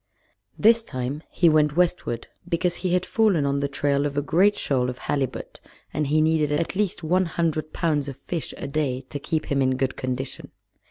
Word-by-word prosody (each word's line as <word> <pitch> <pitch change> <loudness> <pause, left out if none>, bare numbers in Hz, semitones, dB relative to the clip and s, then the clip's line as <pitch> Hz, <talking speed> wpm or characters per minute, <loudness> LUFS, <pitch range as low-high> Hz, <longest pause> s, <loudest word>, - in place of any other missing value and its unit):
This 230 +2 +5
time 130 - -4
he 175 - +2
went 150 -2 +4
westward, 170 -10 0 0.2
because 175 0 0
he 180 -1 0
had 180 0 0
fallen 205 -10 +2
on 140 0 +1
the 140 - 0
trail 140 0 +1
of 145 0 -6
a 145 - +1
great 195 +8 +3
shoal 125 -3 0
of 125 - -5
halibut, 135 -2 -3 0.3
and 150 -1 0
he 155 +2 +3
needed 155 -2 +2
at 160 +5 0
least 200 -4 -1
one 180 +4 +2
hundred 160 -2 -1
pounds 150 -4 0
of 135 - -8
fish 170 -3 -4
a - - -5
day 140 -3 -1
to 145 - -4
keep 160 +2 -2
him 140 -1 +2
in 130 -1 +2
good 130 0 -1
condition. 130 +1 -4
150 Hz, 200 wpm, -24 LUFS, 140-170 Hz, 0.3 s, This